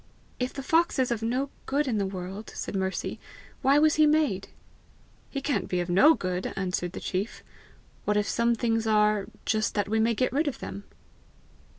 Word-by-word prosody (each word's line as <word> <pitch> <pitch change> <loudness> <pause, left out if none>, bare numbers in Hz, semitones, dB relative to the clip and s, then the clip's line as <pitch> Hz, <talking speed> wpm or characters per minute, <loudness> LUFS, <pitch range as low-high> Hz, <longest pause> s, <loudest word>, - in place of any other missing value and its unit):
"If 250 0 -1
the 275 - -6
fox 330 +4 +2
is 255 -2 +1
of 230 -2 -1
no 255 +5 -1 0.2
good 285 +2 +1
in 225 -5 0
the 195 - 0
world," 190 +3 -6
said - - -4
Mercy, 190 0 -2 0.4
"why 275 +2 +4
was 310 +1 +4
he 305 - +7
made?" 295 -11 +2 0.8
"He 275 - -4
can't 260 -9 -1
be 180 - -1
of 175 0 -2
no 295 - +7
good," 185 0 -3
answered 180 -2 -2
the - - -5
chief. 195 +4 -3 0.6
"What 210 0 +2
if 210 - +1
some 235 0 +2
things 225 -1 0
are, 210 -1 +3 0.2
just 215 0 0
that 205 -2 +1
we 220 +2 +1
may 230 +1 +2
get 255 +3 0
rid 300 +3 +1
of 285 - -2
them?" 200 - -7
220 Hz, 195 wpm, -27 LUFS, 195-270 Hz, 0.8 s, he